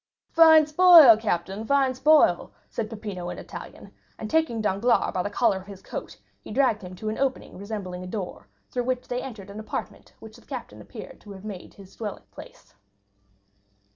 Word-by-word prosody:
"Fine 320 -1 +7
spoil, 310 -5 +8
captain, 200 -1 -3
fine 270 +1 +2
spoil!" 265 - +3 0.2
said 215 -2 -4
Peppino 205 -5 -6
in - - -6
Italian, - - -10 0.2
and 215 - -7
taking 320 -8 +1
Danglars 215 +3 +1
by 185 - 0
the 205 - -3
collar 210 -1 +1
of 190 +1 -11
his 195 -2 -11
coat 105 - -7 0.2
he - - -13
dragged 230 -2 +1
him 180 -1 -9
to 215 +4 -5
an 215 - -4
opening 270 -1 -2
resembling 195 -2 -6
a - - -7
door, 185 - -6 0.2
through 245 -1 -2
which 255 0 -2
they 245 0 -3
entered 210 -7 -9
the 200 +2 -8
apartment 220 - -7
which - - -13
the - - -20
captain - - -8
appeared - - -11
to 205 - -12
have 190 +1 -12
made 200 -4 -9
his 195 -2 -15
dwelling 215 -3 -6
place. - - -14
215 Hz, 185 wpm, -25 LUFS, 195-255 Hz, 0.2 s, spoil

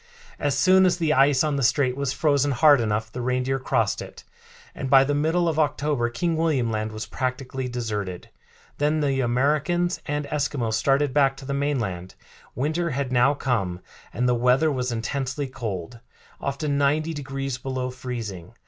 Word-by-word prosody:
As 140 -2 0
soon 185 +4 +5
as 180 - +1
the 160 -3 +1
ice 135 0 +4
on 150 -2 0
the - - -1
strait 130 0 +2
was 140 -1 -1
frozen 145 -1 +2
hard 145 +1 +5
enough 110 0 -1
the 125 - -5
reindeer 130 +2 0
crossed 130 - 0
it, - - -10 0.5
and 135 - -5
by 135 0 +7
the 145 +2 0
middle 160 +4 +1
of 160 -1 0
October 145 -4 0
King 165 +8 -1
William 150 -8 +1
Land 110 0 -2
was 110 0 -5
practically 130 +2 -3
deserted. 105 -7 -4 0.5
Then 150 +2 +1
the 135 -2 +1
Americans 150 +8 +1
and 145 0 -2
Eskimos 140 -6 -2
started 135 +4 +2
back 135 -2 +3
to 135 - -10
the 140 - -3
mainland. 115 -11 -2 0.4
Winter 160 +6 -1
had 140 -2 -2
now 130 +3 +4
come, 100 -10 -1 0.3
and 125 +3 0
the 125 - +3
weather 125 +6 +3
was 125 -2 -2
intensely 130 +4 -2
cold, 115 -4 -6 0.4
often 140 +1 -2
ninety 155 +3 +1
degrees 135 -3 -4
below 130 -1 -3
freezing. 115 -9 -6
135 Hz, 170 wpm, -24 LUFS, 120-145 Hz, 0.5 s, by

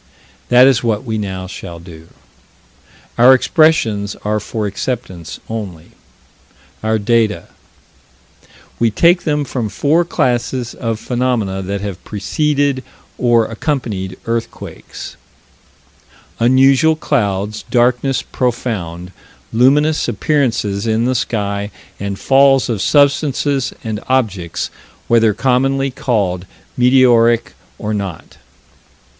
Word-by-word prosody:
That 125 +1 +7
is 135 -4 +3
what 110 -1 0
we 110 -3 -3
now 95 -2 -4
shall 85 -2 -8
do. 80 -1 -13 1.1
Our 130 +2 +8
expressions 130 - +2
are 105 +1 0
for 110 +1 -4
acceptance 100 -5 -5
only. 95 -7 -7 0.9
Our 110 0 +1
data: 110 -4 0 1.3
We 115 - +3
take 170 - +3
them 150 -2 0
from 120 -5 -3
four 150 - +2
classes 125 -5 -1
of 115 -2 -3
phenomena 120 -7 -1
that 100 +1 -4
have 100 -4 -6
preceded 140 +6 -1 0.4
or 120 -2 +3
accompanied 110 -7 -3
earthquakes: 115 0 -6 1.2
Unusual 135 +6 +4
clouds, 105 -8 -1
darkness 125 +2 +1
profound, 95 -8 -3 0.4
luminous 145 +6 +3
appearances 115 -5 0
in 110 +1 +1
the 130 - +1
sky, 100 -4 -2 0.3
and 100 -1 -4
falls 135 +1 +4
of 110 -5 -1
substances 140 0 +2
and 110 -2 -3
objects 100 -10 -1 0.4
whether 115 -3 +3
commonly 135 +3 +1
called 100 -8 -1 0.3
meteoritic 120 -2 +4 0.3
or 110 -1 -3
not. 100 -5 -6
115 Hz, 105 wpm, -16 LUFS, 100-130 Hz, 1.3 s, Our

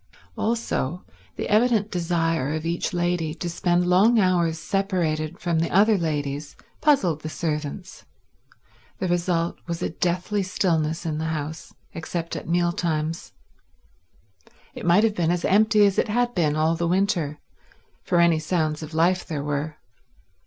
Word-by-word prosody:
Also 215 - -2 0.3
the - - -3
evident 215 -1 +2
desire 165 -5 0
of 155 0 -4
each 170 +1 -1
lady 175 -2 -1
to 175 - -5
spend 175 +1 +1
long 195 +7 +4
hours 175 -4 +2
separated 175 -4 -1
from 170 -2 -1
the 165 - 0
other 210 +4 +4
ladies 145 -4 -3 0.3
puzzled 190 - +2
the 155 - -5
servants. 155 +3 -4 0.9
The 185 - -2
result 175 -1 0
was 170 +1 -3
a - - -1
deathly 180 +4 -1
stillness 165 -3 0
in 155 -2 -2
the 160 - -2
house, 160 0 -5 0.2
except 165 +1 -4
at - - -6
meal 175 0 +2
times. 165 -1 -3 1.4
It - - -6
might 180 +5 +5
have 225 -2 +3
been 170 -5 0
as 175 0 0
empty 210 +1 +4
as 200 -1 +2
it - - +1
had 240 +3 0
been 155 -6 +1
all 155 +1 +2
the 170 +1 -1
winter, 175 -5 0 0.6
for 175 - +1
any 170 -2 +4
sounds 155 -1 -1
of 155 0 -8
life 180 +3 +2
there 150 -4 -4
were. 150 +1 -3
170 Hz, 150 wpm, -24 LUFS, 155-185 Hz, 1.4 s, might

